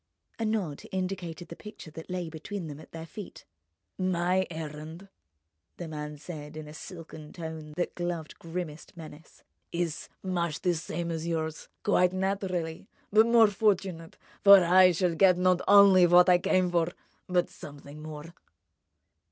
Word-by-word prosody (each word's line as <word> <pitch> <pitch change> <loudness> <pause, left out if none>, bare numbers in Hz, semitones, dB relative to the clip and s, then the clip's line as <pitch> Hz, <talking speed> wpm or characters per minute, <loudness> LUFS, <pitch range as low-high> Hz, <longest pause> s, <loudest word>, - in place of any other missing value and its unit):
A 225 - -1
nod 200 -10 -2
indicated 180 -3 -4
the 170 - -8
picture 210 -6 -11
that 160 +3 -10
lay 180 -1 -3
between 165 +4 -6
them, 150 -2 -8
at 155 - -14
their 165 0 -7
feet. 205 +3 -10 0.5
"My 185 0 +1
errand," 160 +3 -8 0.7
the 175 - -6
man 150 -1 -6
said 150 -1 -9
in 155 -1 -7
a 150 - -10
silken 160 -3 -10
tone 160 -2 -7
that 175 - -1
gloved 175 -3 -4
grimmest 165 -1 -7
menace, 160 -1 -12 0.3
"is 170 -2 -3
much 170 -4 -2
the 180 - +2
same 170 +1 -4
as 165 0 -3
yours—quite 165 +3 0
naturally—but 190 +2 0
more 230 -2 +6
fortunate; 190 -5 -1 0.3
for 200 -2 +9
I 180 +1 +6
shall 175 0 +1
get 180 +1 +5
not 180 0 +3
only 200 -3 +7
what 175 +1 +6
I 180 -1 +6
came 180 0 +2
for, 170 0 +1 0.4
but 180 -1 +2
something 145 0 -11
more." 155 +1 -8
175 Hz, 145 wpm, -28 LUFS, 160-185 Hz, 0.7 s, for